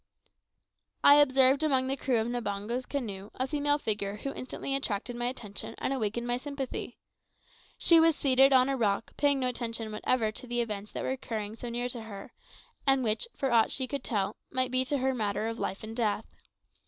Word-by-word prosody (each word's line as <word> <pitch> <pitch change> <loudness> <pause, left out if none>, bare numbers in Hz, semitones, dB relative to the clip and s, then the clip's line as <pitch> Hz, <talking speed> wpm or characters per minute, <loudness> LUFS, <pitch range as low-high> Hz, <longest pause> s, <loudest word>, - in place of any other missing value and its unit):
I 285 - +9
observed 270 -1 +5
among 270 -4 +2
the 265 +1 0
crew 255 -2 0
of 220 - 0
Mbango's 235 +1 -3
canoe 210 -8 -4
a 255 - 0
female 290 +1 +1
figure 210 -6 -2
who 275 +6 -5
instantly 265 +1 -5
attracted 245 -2 -2
my 240 0 -1
attention 220 -3 -5
and 270 - -1
awakened 235 -1 -2
my 240 0 0
sympathy. 270 -2 -5 0.8
She 335 -1 +6
was 325 -1 +5
seated 270 -1 +4
on 255 -1 +6
a 275 - 0
rock, 220 -3 0
paying 285 -1 +2
no 255 - 0
attention 230 -3 -3
whatever 220 +1 0
to 250 +4 -8
the 240 0 -1
events 210 -3 -3
that - - -3
were - - -1
occurring 220 -5 -4
so 240 +1 -6
near 240 +1 -2
to 240 -1 -2
her, 205 -3 -9 0.5
and 270 -1 +4
which, 220 - 0
for 270 -2 0
aught 230 -2 +5
she 260 - -2
could 280 +2 -4
tell, 205 -3 -1
might 255 -1 0
be 255 0 +2
to 285 +2 0
her 265 0 +1
matter 215 -3 -1
of 230 0 -4
life 195 +3 -3
or - - -6
death. 220 -2 0
245 Hz, 200 wpm, -29 LUFS, 220-265 Hz, 0.8 s, I